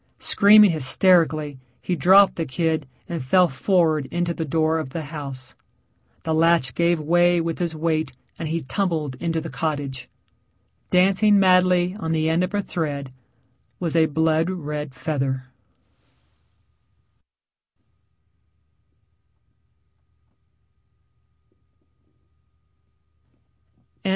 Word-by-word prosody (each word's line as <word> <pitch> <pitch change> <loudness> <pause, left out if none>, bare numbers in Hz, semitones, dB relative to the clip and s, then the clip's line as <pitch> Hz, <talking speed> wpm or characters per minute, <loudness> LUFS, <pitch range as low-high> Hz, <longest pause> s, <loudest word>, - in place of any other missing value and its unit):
Screaming 210 -1 +5
hysterically 155 -1 +2 0.2
he 180 - -3
dropped 190 +6 +5
the 165 - -3
kid 160 +1 -2 0.2
and 170 -5 -5
fell 180 +7 +3
forward 160 -1 0
into 175 0 -2
the 165 - -4
door 160 +2 0
of 155 - -5
the 160 +4 -5
house. 140 -3 -7 0.7
The 160 - -2
latch 165 -5 +2
gave 170 +2 +1
way 175 +3 +2
with 165 -1 -3
his 170 -2 -2
weight 155 -2 -1 0.3
and 165 - -4
he 165 +2 -2
tumbled 155 -2 -2
into 165 -1 -2
the 160 0 -7
cottage. 145 -5 -4 0.8
Dancing 195 +3 +3
madly 185 -1 +3
on 160 -4 -3
the 160 0 0
end 170 +3 +1
of 185 +3 -3
a 205 - -1
thread 140 -7 -4 0.7
was 170 -2 -3
a 160 -1 +4
blood 160 +2 0
red 150 -6 -5
feather. 135 -4 -3
160 Hz, 100 wpm, -22 LUFS, 150-175 Hz, 0.8 s, Screaming